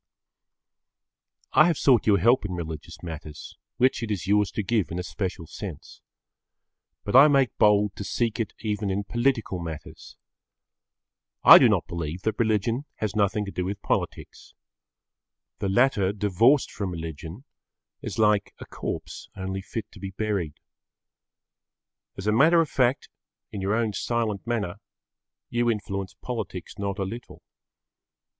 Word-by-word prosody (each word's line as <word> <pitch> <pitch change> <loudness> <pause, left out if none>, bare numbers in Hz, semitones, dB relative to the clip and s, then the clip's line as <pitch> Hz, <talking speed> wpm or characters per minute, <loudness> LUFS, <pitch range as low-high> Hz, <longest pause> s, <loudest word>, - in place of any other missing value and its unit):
I 155 - +7
have 170 -4 +1
sought 125 -6 +3
your 100 -2 +5
help 120 +7 +4
in 95 -3 -4
religious 80 -2 -7
matters, 80 -3 -8 0.2
which 130 0 +2
it 115 - -4
is 100 -5 -2
yours 105 0 +3
to 105 - -2
give 105 -1 0
in 85 - -5
a 90 - -2
special 95 -2 -4
sense. - - -9 1.0
But 105 - -2
I 135 +3 +10
make 135 -5 +2
bold 105 -1 +4
to - - -4
seek 115 +2 -1
it 110 -4 -3
even 105 -2 -2
in 100 +1 -1
political 120 -4 0
matters. 80 -3 -8 1.3
I - - +11
do - - +6
not - - +1
believe 85 +1 -5
that 110 -1 -1
religion 115 +4 +1
has 105 -2 -3
nothing 105 0 +1
to 100 - -6
do 90 - -3
with 100 +2 -4
politics. - - -3 1.0
The 100 - -1
latter 100 -3 +3
divorced 105 +7 +3
from 100 -3 -4
religion 80 - -7 0.6
is - - -6
like 105 -2 +2
a - - -9
corpse - - -6
only 95 0 -4
fit 105 +2 -6
to 105 - -14
be 95 +1 -5
buried. 95 -6 -2 1.6
As 95 - -6
a 105 - +3
matter 155 +10 +5
of 165 -3 +1
fact, 130 +1 +1 0.4
in 100 - -5
your 100 +3 0
own 115 -2 0
silent 115 -2 -2
manner, 105 -5 -2 0.7
you 120 0 +1
influence 100 -3 -3
politics 105 -9 -5
not 100 0 -2
a 100 - -1
little. 115 +6 -8
105 Hz, 150 wpm, -26 LUFS, 95-115 Hz, 1.6 s, I